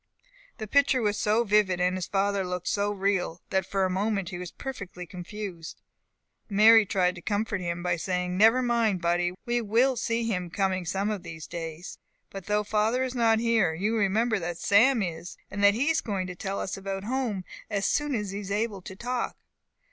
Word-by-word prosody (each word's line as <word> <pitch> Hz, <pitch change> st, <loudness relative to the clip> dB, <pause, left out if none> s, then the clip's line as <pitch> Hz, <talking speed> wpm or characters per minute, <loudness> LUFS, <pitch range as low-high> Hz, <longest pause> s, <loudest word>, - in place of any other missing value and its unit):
The 220 Hz, -, -5 dB
picture 265 Hz, +1 st, +3 dB
was 205 Hz, -1 st, +1 dB
so 215 Hz, +2 st, +2 dB
vivid, 205 Hz, -4 st, +2 dB
and 180 Hz, +1 st, +2 dB
his 185 Hz, -2 st, -3 dB
father 200 Hz, 0 st, 0 dB
looked 180 Hz, -1 st, -4 dB
so 205 Hz, 0 st, +1 dB
real, 195 Hz, -4 st, -1 dB
that 190 Hz, -1 st, 0 dB
for 195 Hz, -1 st, +1 dB
a -, -, 0 dB
moment 195 Hz, -1 st, -1 dB
he 175 Hz, -3 st, -6 dB
was 180 Hz, -1 st, -6 dB
perfectly 195 Hz, -9 st, -7 dB
confused. 180 Hz, -2 st, -7 dB, 0.7 s
Mary 215 Hz, +1 st, +6 dB
tried 180 Hz, -2 st, +2 dB
to 175 Hz, -, -11 dB
comfort 205 Hz, +1 st, -1 dB
him 175 Hz, 0 st, -3 dB
by 175 Hz, -1 st, 0 dB
saying, 180 Hz, +1 st, -2 dB
"Never 225 Hz, +6 st, +5 dB
mind, 230 Hz, -5 st, +1 dB
buddy; 175 Hz, +1 st, 0 dB
we 240 Hz, 0 st, 0 dB
will 235 Hz, +5 st, +2 dB
see 230 Hz, 0 st, -1 dB
him 180 Hz, -6 st, -2 dB
coming 185 Hz, 0 st, -1 dB
some 195 Hz, +5 st, -1 dB
of 205 Hz, -3 st, -3 dB
these 160 Hz, -3 st, -8 dB
days. 165 Hz, 0 st, -7 dB, 0.3 s
But 195 Hz, -2 st, -8 dB
though 210 Hz, 0 st, +1 dB
father 220 Hz, +4 st, +1 dB
is 255 Hz, -1 st, -3 dB
not 230 Hz, -3 st, +3 dB
here, 225 Hz, -7 st, +2 dB
you 205 Hz, +7 st, 0 dB
remember 220 Hz, +2 st, +1 dB
that 175 Hz, -1 st, -4 dB
Sam 225 Hz, +5 st, +4 dB
is, 170 Hz, -1 st, -6 dB
and 200 Hz, +1 st, -3 dB
that 200 Hz, 0 st, +6 dB
he 280 Hz, +7 st, +2 dB
is 320 Hz, -, +1 dB
going 195 Hz, -5 st, -2 dB
to 180 Hz, -1 st, -7 dB
tell 195 Hz, +2 st, -4 dB
us 190 Hz, -, -3 dB
about 195 Hz, 0 st, -4 dB
home, 235 Hz, -4 st, -2 dB, 0.3 s
as 200 Hz, -1 st, -1 dB
soon 295 Hz, +2 st, +1 dB
as 210 Hz, -3 st, -3 dB
he 200 Hz, -, -4 dB
is 200 Hz, -2 st, -7 dB
able 205 Hz, -1 st, -1 dB
to 190 Hz, -, -9 dB
talk. 245 Hz, +3 st, -3 dB
200 Hz, 200 wpm, -27 LUFS, 180-225 Hz, 0.7 s, Mary